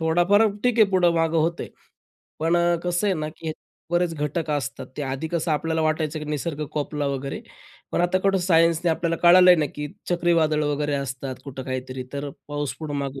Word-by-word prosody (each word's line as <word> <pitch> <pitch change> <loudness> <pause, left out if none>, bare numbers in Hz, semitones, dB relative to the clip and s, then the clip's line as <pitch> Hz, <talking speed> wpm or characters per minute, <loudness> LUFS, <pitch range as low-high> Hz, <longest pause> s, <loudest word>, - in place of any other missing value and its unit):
थोडाफार 175 +6 +4 0.2
ठीक 245 -2 +2
आहे, 215 - +8
पुढं 175 -2 +3
मागं 165 0 +1
होतं 165 +2 0
आहे, - - -8 0.7
पण 165 +2 +2
अ, 170 0 +3
कसं 175 +3 0
आहे 195 - +2
ना, 155 -1 -3
की 160 -1 -4 0.4
बरेच 175 -1 +1
घटक 150 +2 -2
असतात, 140 -3 -3
ते 150 - -3
आधी 135 +4 -3
कसं 170 0 -1
आपल्याला 160 +1 0
वाटायचं, 155 0 0
की 150 - -6
निसर्ग 150 +1 -3
कोपला 150 -1 -2
वगैरे, 140 0 -3 0.5
पण - - +1
आता 175 +1 +2
कुठं 195 -1 +2
सायन्सने 165 -1 +3
आपल्याला 165 +1 0
कळालं 180 +1 +8
आहे 180 - +7
ना, 150 - +1
की 150 0 -4 0.2
चक्रीवादळ 165 -3 +2
वगैरे 145 0 -1
असतात. 135 -1 -4
कुठं 135 -1 -7
काहीतरी, 130 0 -4
तर 140 +1 -4 0.2
पाऊस 145 -1 -3
पुढे 155 -2 -5
मागे 140 -1 -4
160 Hz, 195 wpm, -24 LUFS, 145-175 Hz, 0.7 s, आहे